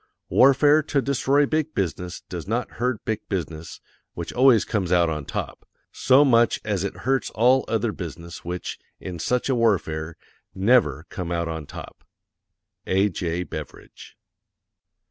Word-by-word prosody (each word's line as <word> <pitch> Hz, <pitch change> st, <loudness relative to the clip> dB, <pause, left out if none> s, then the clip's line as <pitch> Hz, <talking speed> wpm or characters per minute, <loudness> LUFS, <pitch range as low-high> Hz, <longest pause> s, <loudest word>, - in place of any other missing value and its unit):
Warfare 140 Hz, +3 st, +5 dB
to 145 Hz, -1 st, 0 dB
destroy 140 Hz, +1 st, +2 dB
big 155 Hz, +1 st, -1 dB
business 90 Hz, -1 st, -3 dB
does 85 Hz, -2 st, -8 dB
not 115 Hz, +3 st, -2 dB
hurt 125 Hz, -3 st, -1 dB
big 110 Hz, -1 st, -3 dB
business, 80 Hz, -4 st, -5 dB, 0.4 s
which 85 Hz, -, -6 dB
always 125 Hz, -3 st, +5 dB
comes 95 Hz, -6 st, -2 dB
out 85 Hz, -2 st, +3 dB
on 75 Hz, -2 st, -4 dB
top, -, -, -5 dB, 0.3 s
SO 135 Hz, +3 st, +4 dB
MUCH 120 Hz, -3 st, +3 dB
AS 100 Hz, -3 st, -1 dB
IT 100 Hz, -, -3 dB
HURTS 130 Hz, -2 st, +1 dB
ALL 125 Hz, +4 st, +4 dB
OTHER 115 Hz, 0 st, 0 dB
BUSINESS 85 Hz, -2 st, -8 dB
WHICH, 90 Hz, +1 st, -5 dB, 0.2 s
IN 90 Hz, -2 st, -7 dB
SUCH 125 Hz, +10 st, 0 dB
A -, -, +3 dB
WARFARE, 85 Hz, -9 st, 0 dB, 0.4 s
NEVER 95 Hz, -, +3 dB
COME 90 Hz, -2 st, -5 dB
OUT 85 Hz, -1 st, -1 dB
ON 80 Hz, -3 st, -5 dB
TOP. -, -, -10 dB, 0.8 s
A.J. 90 Hz, -3 st, 0 dB
BEVERIDGE. 75 Hz, -4 st, -10 dB
100 Hz, 145 wpm, -24 LUFS, 85-125 Hz, 0.8 s, Warfare